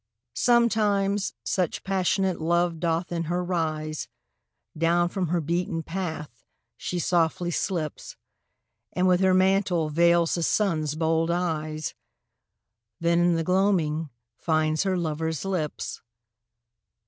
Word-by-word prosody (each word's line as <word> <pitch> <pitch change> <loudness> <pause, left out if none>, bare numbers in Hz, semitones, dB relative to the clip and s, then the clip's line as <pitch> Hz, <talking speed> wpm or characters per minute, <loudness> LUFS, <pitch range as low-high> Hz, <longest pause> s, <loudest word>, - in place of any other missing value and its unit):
Sometimes 210 -4 +2
such 180 -4 -1
passionate 190 -1 0
love 170 0 +1
doth 170 +1 -1
in 170 -1 -2
her 175 +3 -1
rise, 155 -3 -2 0.7
Down 170 +2 +2
from 185 -1 -2
her 175 +2 0
beaten 165 +1 -2
path 160 -7 -5 0.3
she 180 - -4
softly 175 0 +1
slips, 165 -3 -3 0.8
And 185 +1 +2
with 180 -1 +4
her 190 -1 +4
mantle 185 -4 +2
veils 170 +1 +3
the 170 - -1
Sun's 165 -5 +1
bold 160 +1 +1
eyes, 155 -3 -2 1.1
Then 170 +1 +2
in 175 0 +3
the 165 - 0
gloaming 170 -4 +1 0.3
finds 155 -1 +1
her 190 -1 +1
lover's 160 -1 -2
lips. 180 -6 -3
170 Hz, 115 wpm, -26 LUFS, 160-185 Hz, 1.1 s, with